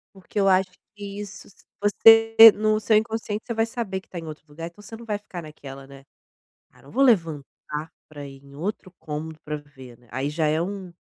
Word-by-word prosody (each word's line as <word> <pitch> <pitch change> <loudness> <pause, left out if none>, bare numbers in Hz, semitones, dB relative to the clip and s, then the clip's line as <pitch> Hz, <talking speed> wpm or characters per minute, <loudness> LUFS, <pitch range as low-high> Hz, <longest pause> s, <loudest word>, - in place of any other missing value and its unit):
Porque 195 +2 -6
eu 195 - +3
acho 190 0 +3 0.3
que 200 -1 -8
isso 210 +1 -9
s 200 - -22 0.2
você, 225 +2 +6 0.2
no 215 0 +1
seu 220 0 +2
inconsciente, 220 -1 -1
você 235 - -2
vai 225 0 +1
saber 225 -5 -4
que - - -24
tá 180 - -9
em 165 - -9
outro 155 -1 -10
lugar, 165 +3 -8
então 175 +5 -14
você 225 +2 -10
não 235 +1 -11
vai 210 -2 -2
ficar 185 -4 -9
naquela, 140 -3 -11
né, 135 0 -14 0.7
"Ah, - - -23
não 140 - -16
vou 270 +4 +1
levantar 165 - +2 0.6
pra 145 -2 -9
ir 135 0 -13
em 140 0 -17
outro 185 +2 -5
cômodo 155 +1 -6
pra 150 0 -3
ver, 130 -5 -14
né", 120 - -25
aí 130 +4 -2
já 155 0 0
é 155 +2 +1
um 190 -1 -5
185 Hz, 220 wpm, -24 LUFS, 150-210 Hz, 0.7 s, você